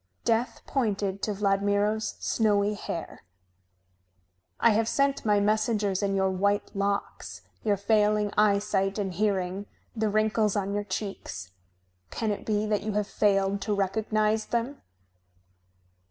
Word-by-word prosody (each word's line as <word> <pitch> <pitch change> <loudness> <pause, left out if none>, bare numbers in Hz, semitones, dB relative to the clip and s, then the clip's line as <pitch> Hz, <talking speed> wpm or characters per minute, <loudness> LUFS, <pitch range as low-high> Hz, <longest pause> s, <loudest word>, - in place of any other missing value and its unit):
Death 230 +2 0
pointed 200 -6 -1
to 215 - -1
Vladmiro's 205 +2 +1
snowy 210 -2 +1
hair. 170 -5 -6 1.4
"I 230 - +5
have 220 +1 +2
sent 275 +2 +1
my 205 -1 +4
messengers 210 -1 +1
in 200 -1 0
your 190 0 +2
white 200 +3 0
locks, 200 0 -3 0.2
your 205 -2 +2
failing 210 0 +2
eyesight 200 -1 +2
and 195 -3 -2
hearing, 195 0 -1 0.3
the 220 -1 0
wrinkles 215 0 +1
on 200 -1 -1
your 205 0 -2
cheeks. 190 - -5 0.6
Can 220 -2 -2
it 205 - -5
be 210 -1 +1
that 210 -1 0
you 215 0 -3
have 210 0 0
failed 200 -1 +1
to 210 0 -1
recognize 215 +2 0
them?" 240 +4 -2
205 Hz, 130 wpm, -27 LUFS, 200-215 Hz, 1.4 s, I